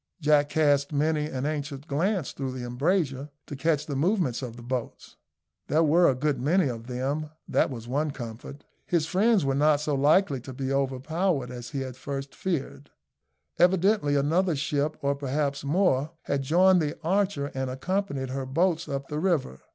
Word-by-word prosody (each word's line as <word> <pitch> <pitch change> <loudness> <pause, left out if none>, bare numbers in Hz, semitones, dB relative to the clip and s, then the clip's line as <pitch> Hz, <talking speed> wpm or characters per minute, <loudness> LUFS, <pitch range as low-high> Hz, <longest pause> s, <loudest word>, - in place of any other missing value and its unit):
Jack 150 -2 +3
cast 145 -1 +2
many 150 +1 +1
an 130 -2 -4
anxious 145 -2 -3
glance 165 +4 -1
through 135 -2 -4
the 125 -1 -5
embrasure, 140 +2 0 0.2
to 145 - -7
catch 150 +1 0
the 145 - -4
movements 160 - +1
of 120 -3 -6
the 120 - -11
boats. 125 -1 -5 0.5
There 160 +2 +3
were 170 +3 +5
a 130 - +1
good 135 -1 -1
many 160 +2 +2
of 115 -1 -6
them 135 +5 -2 0.2
that - - +2
was 120 -4 -7
one 145 +5 0
comfort. 125 +2 -8 0.2
His 170 -3 +1
friends 195 0 +2
were 135 - +1
not 145 +1 +3
so 150 0 -1
likely 145 0 +3
to 130 +2 -9
be 135 +1 -3
overpowered 140 +2 -1
as 120 -1 -7
he 135 -2 -3
at 130 -2 -7
first 135 +1 -6
feared. 145 -5 -4 0.7
Evidently 180 -3 +3
another 160 +5 +2
ship, 145 +1 -1
or 140 0 +2
perhaps 140 0 -2
more, 150 -2 +2
had 140 - -1
joined 180 +6 +4
the 150 0 -2
Archer 185 -5 0
and 130 -1 -2
accompanied 140 -1 -2
her 135 0 -3
boats 165 +3 +1
up 140 -1 -3
the 150 - -3
river. 155 - 0
145 Hz, 175 wpm, -27 LUFS, 135-160 Hz, 0.7 s, were